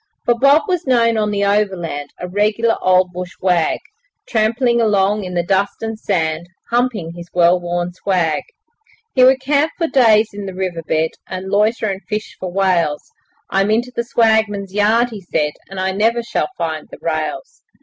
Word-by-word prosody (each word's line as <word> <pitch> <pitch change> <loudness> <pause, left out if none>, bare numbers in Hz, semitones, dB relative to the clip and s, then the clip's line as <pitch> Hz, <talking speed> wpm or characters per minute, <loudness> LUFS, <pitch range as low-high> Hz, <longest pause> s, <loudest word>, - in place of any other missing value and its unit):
For 240 - +4
Bob 275 +6 +4
was 360 -5 -1
known 230 -3 +3
on 215 -1 0
the 200 -1 0
Overland, 185 -8 -1
A 180 - -5
regular 210 +4 +1
old 185 -1 +3
bush 180 0 -6
wag, 180 -3 +1 0.5
Tramping 235 +2 +1
along 205 -1 +2
in 180 -1 -6
the 175 - +1
dust 195 +4 0
and 225 -1 -4
sand, 165 -5 -1 0.2
Humping 235 -8 0
his 170 0 -10
well 175 0 +4
worn 175 0 -3
swag. 180 -4 0 0.7
He 255 - +4
would 260 +1 +6
camp 285 +4 +1
for 335 - 0
days 225 -7 +4
in 200 -1 -6
the 190 - -7
river 185 -3 -3
bed, 160 0 0 0.2
And 185 +1 -6
loiter 215 +3 +2
and 195 -2 -2
'fish 215 0 -4
for 185 -1 -5
whales'. 175 -6 0 0.4
'I'm 195 +1 +2
into 235 +3 +1
the 235 - 0
swagman's 220 -4 +1
yard,' 225 +4 +2
he 210 -3 -8
said, 150 -4 -1 0.2
'And 195 0 -6
I 190 0 0
never 225 +4 +1
shall - - -2
find 160 -2 -3
the - - -10
rails.' 165 - -4
200 Hz, 180 wpm, -18 LUFS, 180-230 Hz, 0.7 s, would